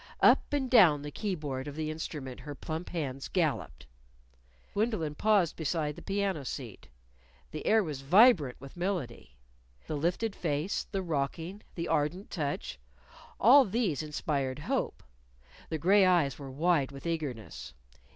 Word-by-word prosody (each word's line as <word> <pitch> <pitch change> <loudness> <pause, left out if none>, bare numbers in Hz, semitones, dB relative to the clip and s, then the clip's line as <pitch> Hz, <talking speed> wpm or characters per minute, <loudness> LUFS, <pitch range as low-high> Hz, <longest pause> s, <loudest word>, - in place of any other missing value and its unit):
Up - - +5
and 285 -2 0
down 175 - +6
the 150 - -6
key 205 +1 -2
board 140 -4 -5
of 145 - -6
the 155 0 -2
instrument 150 -5 -6
her 145 -1 -8
plump 160 +5 -5
hands 140 -6 -4
galloped. 150 - -1 0.9
Gwendolyn 205 -8 0
paused 200 0 +2
beside 155 -2 -2
the - - -10
piano 195 -6 -1
seat. 125 -4 -7 0.6
The - - -6
air 220 0 +5
was 150 -6 -5
vibrant 170 - +5
with 135 0 -11
melody. 175 - -4 0.5
The 155 - -3
lifted 180 +8 -1
face, 155 +3 -2
the 195 -2 -2
rocking, 165 +5 -3
the 170 -1 -3
ardent 165 +5 -1
touch 145 - -3 0.6
all 265 +6 +8
these 205 - 0
inspired 145 -3 -2
hope. 150 - -2 0.7
The 160 - -1
gray 195 +6 +5
eyes 170 -8 +3
were 140 -1 -7
wide 145 0 +1
with 135 +2 -11
eagerness. 120 - -4
155 Hz, 145 wpm, -30 LUFS, 140-190 Hz, 0.9 s, all